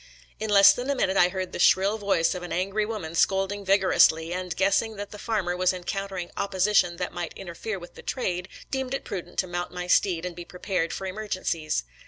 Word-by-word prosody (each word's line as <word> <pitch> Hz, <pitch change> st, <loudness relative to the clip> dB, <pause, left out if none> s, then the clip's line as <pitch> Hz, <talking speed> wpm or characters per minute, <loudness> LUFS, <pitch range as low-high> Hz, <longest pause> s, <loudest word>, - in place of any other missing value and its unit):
In 215 Hz, 0 st, -3 dB
less 200 Hz, -1 st, +8 dB
than 245 Hz, +5 st, -5 dB
a 280 Hz, -, +1 dB
minute 190 Hz, -7 st, +1 dB
I 180 Hz, -2 st, +5 dB
heard 185 Hz, 0 st, -4 dB
the -, -, -6 dB
shrill 195 Hz, +4 st, +4 dB
voice 195 Hz, -5 st, +2 dB
of 180 Hz, -, -5 dB
an 175 Hz, -, -7 dB
angry 195 Hz, +4 st, 0 dB
woman 200 Hz, -8 st, -5 dB
scolding 195 Hz, +3 st, +1 dB
vigorously, 185 Hz, -4 st, +4 dB
and, 180 Hz, -2 st, -4 dB
guessing 195 Hz, +3 st, +1 dB
that 205 Hz, 0 st, -7 dB
the 210 Hz, -, -9 dB
farmer 200 Hz, -6 st, -1 dB
was 185 Hz, +1 st, +2 dB
encountering 185 Hz, 0 st, -4 dB
opposition 190 Hz, -2 st, +2 dB
that 180 Hz, 0 st, -3 dB
might 175 Hz, -2 st, -4 dB
interfere 195 Hz, +3 st, -5 dB
with 175 Hz, -1 st, -11 dB
the -, -, -12 dB
trade, 185 Hz, -7 st, -3 dB, 0.2 s
deemed 265 Hz, -1 st, -2 dB
it -, -, -6 dB
prudent 175 Hz, -2 st, -6 dB
to -, -, +2 dB
mount 175 Hz, 0 st, -4 dB
my 180 Hz, 0 st, -5 dB
steed 180 Hz, -1 st, +2 dB
and 180 Hz, -1 st, -5 dB
be 175 Hz, -, -7 dB
prepared 180 Hz, -1 st, -2 dB
for 195 Hz, -, -5 dB
emergen 195 Hz, 0 st, -4 dB
cies. 155 Hz, -, -1 dB
190 Hz, 215 wpm, -26 LUFS, 175-200 Hz, 0.2 s, less